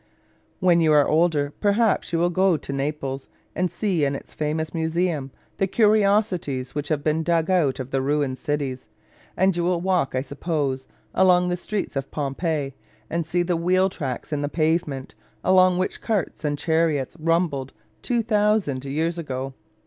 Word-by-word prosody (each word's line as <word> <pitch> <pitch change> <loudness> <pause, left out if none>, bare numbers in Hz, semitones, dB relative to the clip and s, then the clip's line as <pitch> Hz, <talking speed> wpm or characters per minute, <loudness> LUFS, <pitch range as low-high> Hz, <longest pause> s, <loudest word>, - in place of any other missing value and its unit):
When 175 -2 +4
you 160 -1 +4
are 145 -1 +5
older 160 -2 +3
you 145 0 -7
perhaps 210 0 +2
will 170 +1 +2
go 185 -1 +3
to 140 - -6
Naples, 135 -1 -3 0.3
and 180 0 +1
see 185 -7 0
in 140 0 +1
its - - -9
famous 155 +1 -2
museum 160 -3 -1 0.3
the 195 - +1
curiosities 200 - +2
which 145 0 -3
have 150 -2 -1
been 155 +1 +1
dug 165 +1 +1
out 150 -7 +2
of 130 0 -5
the 135 - +1
ruined 140 -1 0
cities; 145 -4 -3 0.5
and 190 0 +3
you 175 - 0
will 175 0 +1
walk, 180 -7 0
I 130 - 0
suppose, 140 -3 -2 0.3
along 180 -1 +4
the 175 - 0
streets 195 +1 -4
of 135 0 -3
Pompeii 145 0 -2 0.4
and 165 -1 -1
see 175 +2 +1
the 175 0 0
wheel 185 +3 +2
tracks 145 -4 -5
in 145 - -1
the 145 - -1
pavement, 155 -4 -1 0.3
along 185 -1 +5
which 185 - -2
carts 210 -8 -2
and 145 -1 0
chariots 160 -4 0
rumbled 160 -5 0 0.3
2000 210 - +1
years 160 +5 -1
ago. 135 -3 -4
160 Hz, 165 wpm, -24 LUFS, 140-180 Hz, 0.5 s, are